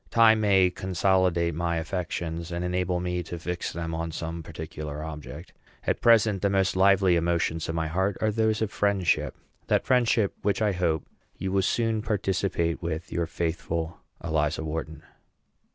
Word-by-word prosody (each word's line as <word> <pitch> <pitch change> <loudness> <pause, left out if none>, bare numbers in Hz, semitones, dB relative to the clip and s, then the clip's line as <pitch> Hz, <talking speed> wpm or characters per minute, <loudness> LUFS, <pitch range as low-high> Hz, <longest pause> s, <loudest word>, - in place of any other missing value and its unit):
Time 105 -5 +5
consolidate 90 -2 +1
my 85 +1 -1
affections, 85 -1 -3
and 85 +1 -2
enable 90 0 0
me 90 0 -2
to 85 0 -6
fix 90 +1 -3
them 85 -1 -4
on 80 0 -3
some 85 +1 -5
particular 75 -2 -6
object. 75 +1 -8 0.3
At - - 0
present 110 -4 +4
the 100 - +2
most 95 -1 +1
lively 95 -1 +5
emotions 85 -1 0
of 80 - -2
my 80 -1 0
heart 95 +5 0
are 110 - +1
those 110 0 +1
of 105 - -2
friendship, 100 -5 +1 0.3
that - - +2
friendship 120 -5 +3
which 100 -1 +1
I 105 -2 +2
hope 85 -4 0 0.3
you 95 +1 -3
will 95 0 +2
soon 115 +2 +1
participate 95 -5 -1
with 85 0 -4
your 85 -1 -1
faithful 85 0 -3 0.2
ELIZA 80 -1 0
WHARTON. 80 0 -5
90 Hz, 155 wpm, -27 LUFS, 80-100 Hz, 0.3 s, Time